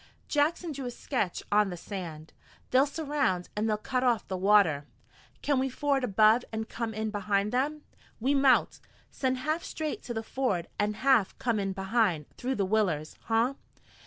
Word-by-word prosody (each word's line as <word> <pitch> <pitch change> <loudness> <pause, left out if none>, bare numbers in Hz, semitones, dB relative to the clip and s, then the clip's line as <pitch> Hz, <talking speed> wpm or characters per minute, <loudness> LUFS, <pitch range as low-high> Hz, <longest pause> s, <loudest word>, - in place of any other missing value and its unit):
Jackson 315 +3 +1
drew 275 -2 -5
a - - -2
sketch 240 -6 -2
on 210 -1 +4
the 175 - -5
sand. 165 -5 -7 0.4
"They'll 265 +3 +5
surround, 285 - -1
an' 210 +1 0
they'll 215 -1 +1
cut 255 +4 -2
off 240 -3 +1
the 190 - -3
water." 185 -7 +3 0.6
"Can 285 -3 +2
we 265 +1 0
ford 275 +1 0
above 220 +1 +4
and 220 0 -3
come 225 -2 -4
in 220 0 -2
behind 205 0 0
them?" 295 +4 -1 0.4
"We 260 +5 +1
mout. 275 -2 +3 0.3
Send 260 -1 -1
half 310 +5 -1
straight 310 -1 -4
to 240 - -4
the 225 - -2
ford 220 -9 -1
an' 210 +1 +1
half 255 -4 +3
come 235 -3 0
in 195 -1 -1
behind, 190 -5 +1
through 260 +2 -2
the 200 - 0
willers, 185 -7 0
huh? 230 +4 +2
225 Hz, 175 wpm, -29 LUFS, 195-265 Hz, 0.6 s, They'll